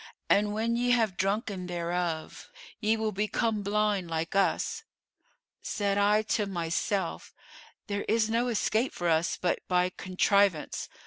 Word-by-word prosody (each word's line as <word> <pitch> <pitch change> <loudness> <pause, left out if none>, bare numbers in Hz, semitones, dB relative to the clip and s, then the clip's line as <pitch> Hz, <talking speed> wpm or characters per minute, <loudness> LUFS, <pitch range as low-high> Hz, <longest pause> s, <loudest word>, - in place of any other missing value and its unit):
And 205 +1 +4
when 230 +2 0
ye 245 +1 0
have 225 -6 +2
drunken 195 -1 -1
thereof, 170 -2 -3 0.3
ye 220 0 +2
will 220 -1 -1
become 215 +2 0
blind 205 -3 0
like 165 +2 -3
us.' 195 - +1 0.8
Said 200 -1 -1
I 210 +1 +4
to 210 -1 0
myself, 175 +1 -2 0.5
'There 200 -1 -3
is 220 0 +2
no 230 +2 +1
escape 230 +1 0
for 175 - -2
us 165 0 +2
but 180 - 0
by 180 0 +2
contrivance. 185 -2 +1
200 Hz, 135 wpm, -29 LUFS, 180-215 Hz, 0.8 s, And